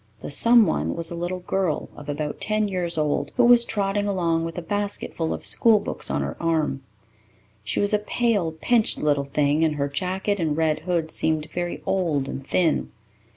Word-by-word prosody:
The - - -4
"someone" 180 - +5
was 165 0 -2
a - - -4
little 175 +2 -4
girl 180 -3 -1
of 145 0 -10
about 145 0 -4
ten 215 0 +1
years 175 -3 -2
old, 150 -1 -1
who 245 - +5
was 240 0 +6
trotting 205 -2 -1
along 170 -4 0
with 165 +2 -6
a - - -2
basketful 200 -4 -2
of - - -5
school 225 -2 +5
books 205 - -4
on - - -1
her - - -4
arm. 155 -5 0 0.8
She 105 - -2
was 205 +1 +2
a 210 - +3
pale, 210 -5 0
pinched 220 +8 +1
little 145 -2 0
thing, 145 +2 +1
and 155 -2 +1
her 140 -1 -1
jacket 190 +7 -2
and 155 -3 -1
red 160 -1 +1
hood 165 -3 0
seemed 155 -1 -1
very 175 0 -4
old 160 -8 0
and 135 0 -7
thin. 170 -4 +1
170 Hz, 190 wpm, -24 LUFS, 150-200 Hz, 0.8 s, was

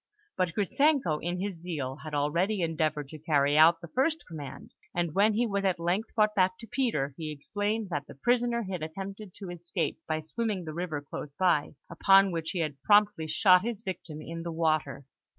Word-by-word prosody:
But 180 -2 0
Gritzenko, 220 - +2
in 175 +1 -2
his 190 -3 -4
zeal, 145 -7 -4
had 155 -1 -5
already 170 +8 +1
endeavoured 155 -3 -1
to 155 - -9
carry 145 -2 +2
out 165 +2 +6
the 170 - -8
first 300 - 0
command; 150 -5 -9 0.2
and 170 -3 0
when 205 +4 +4
he 240 +3 +2
was 200 -3 -1
at 190 -3 +1
length 175 +6 -1
brought 215 -1 +3
back 185 -2 +2
to 230 - -9
Peter, 220 - 0
he 155 -2 -4
explained 205 +8 -2
that 145 -3 -3
the - - -11
prisoner 240 - +1
had 185 -4 -4
attempted 195 +5 -6
to 190 -4 -7
escape 175 0 -3
by 155 0 -1
swimming 200 +3 -3
the 155 - -5
river 165 -3 -3
close 145 0 -7
by, 175 -5 +2
upon 195 +3 +5
which 165 -2 -3
he 180 - -1
had 145 -4 -3
promptly 205 -6 +4
shot 180 +3 +5
his 225 -1 -4
victim 160 -6 -6
in 165 +1 -6
the 170 0 -4
water. 155 -4 0
175 Hz, 195 wpm, -29 LUFS, 155-205 Hz, 0.2 s, out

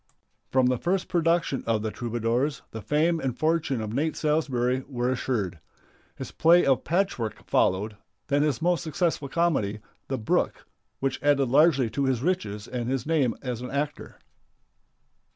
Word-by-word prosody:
From 130 -1 +3
the 125 -1 +1
first 185 +2 0
production 165 -4 +1
of 110 -2 +1
"The 110 - -2
Troubadours" 120 +4 -1
the 110 - -6
fame 160 +6 +1
and 130 -5 -3
fortune 155 -6 0
of 110 0 -4
Nate 155 +5 0
Salsbury 130 -5 0
were 125 -2 -1
assured. 110 -9 -2 0.6
His - - -7
play 170 +2 +5
of 135 -2 +2
"Patchwork" 170 - -1
followed, 105 +3 +1 0.3
then 145 0 +1
his 150 -3 0
most 175 -4 +2
successful 160 -3 -1
comedy, 135 -12 0 0.3
"The 135 - -2
Brook," 110 - -1 0.4
which 135 -1 -1
added 140 -3 +3
largely 140 -2 +4
to 140 +4 0
his 130 -2 0
riches 110 - -2
and 120 -1 -3
his 130 -2 -1
name 150 -7 +1
as 125 -3 -3
an 125 - -5
actor. 145 +1 -4
135 Hz, 155 wpm, -26 LUFS, 120-155 Hz, 0.6 s, play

